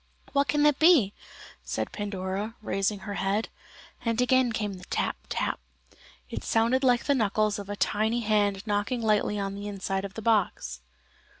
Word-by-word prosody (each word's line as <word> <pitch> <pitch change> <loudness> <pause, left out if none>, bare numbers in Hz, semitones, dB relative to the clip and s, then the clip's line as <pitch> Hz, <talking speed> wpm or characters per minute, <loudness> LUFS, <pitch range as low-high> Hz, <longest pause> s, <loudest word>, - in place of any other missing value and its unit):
"What 280 0 +3
can 295 +3 +2
that 295 -2 +4
be?" 310 - +6 0.5
said - - -3
Pandora, 200 +1 -3
raising 195 0 -1
her 205 - -5
head; 200 +3 0 0.5
and 230 -1 0
again 250 0 +3
came 210 -2 -2
the 185 -1 -10
tap, - - -1
tap. - - -1 0.7
It - - -5
sounded 235 +4 +2
like 245 -2 +4
the 285 - +2
knuckles 215 -3 +1
of 200 0 -8
a 205 - -3
tiny 220 +4 +1
hand 205 -2 +1
knocking 210 +3 -1
lightly 210 -1 +2
on 195 0 -2
the 200 +1 -6
inside 195 -1 -2
of 200 0 -7
the 225 - -5
box. 200 - +1
210 Hz, 170 wpm, -27 LUFS, 200-235 Hz, 0.7 s, be